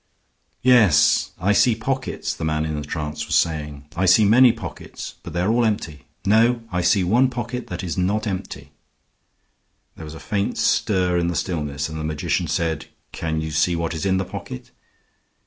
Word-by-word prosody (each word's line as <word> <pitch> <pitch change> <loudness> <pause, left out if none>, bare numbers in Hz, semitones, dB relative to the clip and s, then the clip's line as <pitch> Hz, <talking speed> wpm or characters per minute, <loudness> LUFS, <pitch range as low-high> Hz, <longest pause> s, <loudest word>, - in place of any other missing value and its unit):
"Yes, 105 - +5
I 95 +4 +1
see 115 +2 +4
pockets," 130 -5 -3
the 95 - -7
man 80 0 0
in 80 - -3
the 75 - -3
trance 75 -1 -4
was 85 - 0
saying. 75 -3 -1
"I 95 +2 +1
see 100 +4 +6
many 120 +4 +6
pockets, - - -8
but 85 - -9
they 85 - -1
are 100 +4 +1
all 120 +1 +2
empty. 80 -10 -2 0.2
No; 115 +3 +3
I 90 - 0
see 90 +2 +3
one 120 +9 +3
pocket 125 0 -5
that 90 0 -6
is 90 0 -3
not 105 +4 0
empty." 95 -3 -5 1.2
There 80 - -9
was 75 +1 -9
a - - -9
faint 100 -1 -2
stir 90 -3 +1
in 85 - 0
the 85 - -2
stillness, 75 -5 -2
and 80 0 -7
the - - -4
magician 75 -1 -1
said, 80 -2 -2 0.2
"Can 80 -1 -3
you 80 0 -4
see 80 +3 +1
what 85 0 -2
is 80 - -4
in 95 -1 +2
the 95 - -1
pocket?" 65 - -8
90 Hz, 190 wpm, -22 LUFS, 80-105 Hz, 1.2 s, see